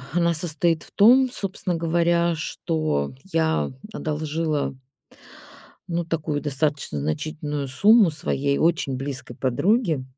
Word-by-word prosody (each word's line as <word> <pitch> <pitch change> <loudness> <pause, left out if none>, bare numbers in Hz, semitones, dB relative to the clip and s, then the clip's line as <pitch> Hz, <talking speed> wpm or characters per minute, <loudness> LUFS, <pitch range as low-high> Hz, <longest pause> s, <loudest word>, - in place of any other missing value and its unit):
она 170 0 +2
состоит 165 0 0
в - - -12
том, 255 +5 +6
собственно 195 -5 -2
говоря, 170 +1 +1
что 155 - -2 0.2
я 160 -1 +1 0.2
одолжила 155 -3 -2 1.1
ну, 170 0 -1
такую 155 -3 -2
достаточно 145 - -1
значительную 145 - -3
сумму 205 - +5
своей 140 -2 -1
очень 160 -5 +1
близкой 130 -2 -5
подруге. 160 - +1
160 Hz, 105 wpm, -23 LUFS, 145-170 Hz, 1.1 s, том